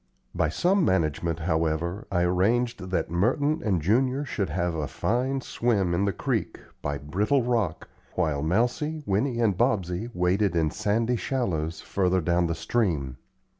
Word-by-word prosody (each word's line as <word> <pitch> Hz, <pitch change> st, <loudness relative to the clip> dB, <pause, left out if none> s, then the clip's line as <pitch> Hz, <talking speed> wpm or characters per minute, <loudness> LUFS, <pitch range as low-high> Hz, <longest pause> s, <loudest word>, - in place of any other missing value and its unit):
By 80 Hz, -, +1 dB
some 180 Hz, -, +2 dB
management, 85 Hz, -, 0 dB
however, 80 Hz, +3 st, -1 dB
I 90 Hz, -2 st, +2 dB
arranged 100 Hz, +4 st, +1 dB
that 85 Hz, -3 st, -1 dB
Merton 140 Hz, -, +1 dB
and 95 Hz, -8 st, 0 dB
Junior 130 Hz, -, +2 dB
should 100 Hz, -, -2 dB
have 85 Hz, +2 st, -1 dB
a 75 Hz, -3 st, -2 dB
fine 130 Hz, +4 st, -1 dB
swim 105 Hz, -9 st, 0 dB
in 95 Hz, +4 st, +1 dB
the 100 Hz, -, +1 dB
creek, -, -, -2 dB, 0.2 s
by 70 Hz, 0 st, -2 dB
Brittle 105 Hz, -, +1 dB
Rock, 115 Hz, -9 st, -1 dB, 0.3 s
while 75 Hz, -3 st, 0 dB
Mousie, 125 Hz, -, 0 dB
Winnie, 115 Hz, +5 st, 0 dB
and 110 Hz, -5 st, +2 dB
Bobsey 105 Hz, -2 st, 0 dB
waded 90 Hz, +1 st, +1 dB
in 80 Hz, -2 st, +2 dB
sandy 115 Hz, +6 st, 0 dB
shallows, 85 Hz, -, -2 dB
further 95 Hz, -1 st, +1 dB
down 85 Hz, +1 st, +1 dB
the 85 Hz, -, -1 dB
stream. 80 Hz, -, -1 dB
95 Hz, 150 wpm, -26 LUFS, 85-120 Hz, 0.3 s, some